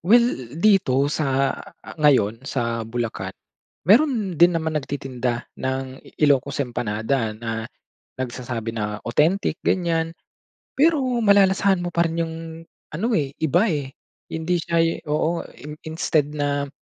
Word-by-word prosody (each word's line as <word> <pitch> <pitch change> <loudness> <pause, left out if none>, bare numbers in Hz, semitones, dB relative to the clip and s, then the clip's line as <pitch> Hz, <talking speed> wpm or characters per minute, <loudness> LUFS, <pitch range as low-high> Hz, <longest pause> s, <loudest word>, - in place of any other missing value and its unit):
well 235 +7 +5 0.3
dito 175 -9 +3
sa, 135 -2 +1 0.3
ah, - - -9
ngayon 115 -7 +3
sa 115 -3 -1
Bulacan, 120 -1 -3 0.5
meron 210 - +3
din 175 -1 +6
naman 160 -1 -1
nagtitinda 130 -3 -3 0.2
ng 130 0 -3 0.2
IIocos 140 -1 +2
empanada. 110 0 -2
Na 115 0 -4 0.5
nagsasabi 120 -2 -4
na 105 -1 -3
authentic, 160 +11 +2
ganyan. 165 -2 +1 0.6
Pero, 310 +1 +4 0.2
malalasahan 195 -2 +4
mo 175 - -3
pa 170 - +4
rin 165 +1 -3
yung 160 0 -5 0.6
ano, 180 +10 -2
eh, 140 -4 0
iba, 175 +8 +3
eh, 140 -3 -3 0.4
hindi 165 +2 0
siya 165 0 +1 0.2
oo, 155 +3 0
i 150 +1 -9
instead 160 -2 +1
na 145 -1 -1
150 Hz, 125 wpm, -23 LUFS, 125-170 Hz, 0.6 s, din